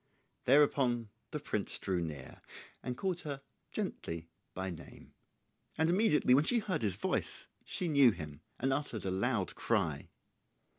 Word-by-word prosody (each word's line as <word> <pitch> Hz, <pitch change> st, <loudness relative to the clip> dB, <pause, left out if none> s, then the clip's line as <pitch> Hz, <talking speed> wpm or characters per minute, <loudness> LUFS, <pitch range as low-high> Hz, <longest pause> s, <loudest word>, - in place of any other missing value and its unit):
Thereupon 130 Hz, -4 st, +4 dB, 0.2 s
the -, -, -3 dB
prince -, -, -1 dB
drew 90 Hz, -2 st, 0 dB
near, 75 Hz, -6 st, -6 dB, 0.4 s
and 125 Hz, -1 st, -4 dB
called 185 Hz, -3 st, -1 dB
her 140 Hz, -2 st, -5 dB, 0.3 s
gently 85 Hz, 0 st, -4 dB, 0.2 s
by 95 Hz, 0 st, -2 dB
name; 80 Hz, -3 st, -11 dB, 0.6 s
and 160 Hz, +1 st, +3 dB
immediately 180 Hz, -, +4 dB
when 140 Hz, +3 st, +6 dB
she 240 Hz, -, +3 dB
heard 195 Hz, -, 0 dB
his 100 Hz, -4 st, +1 dB
voice -, -, -1 dB, 0.2 s
she 180 Hz, -, -2 dB
knew 140 Hz, -5 st, +7 dB
him, 75 Hz, -7 st, -5 dB, 0.2 s
and 135 Hz, +1 st, +1 dB
uttered 135 Hz, -7 st, -2 dB
a 95 Hz, -, 0 dB
loud 100 Hz, 0 st, 0 dB
cry. -, -, 0 dB
125 Hz, 145 wpm, -34 LUFS, 95-150 Hz, 0.6 s, knew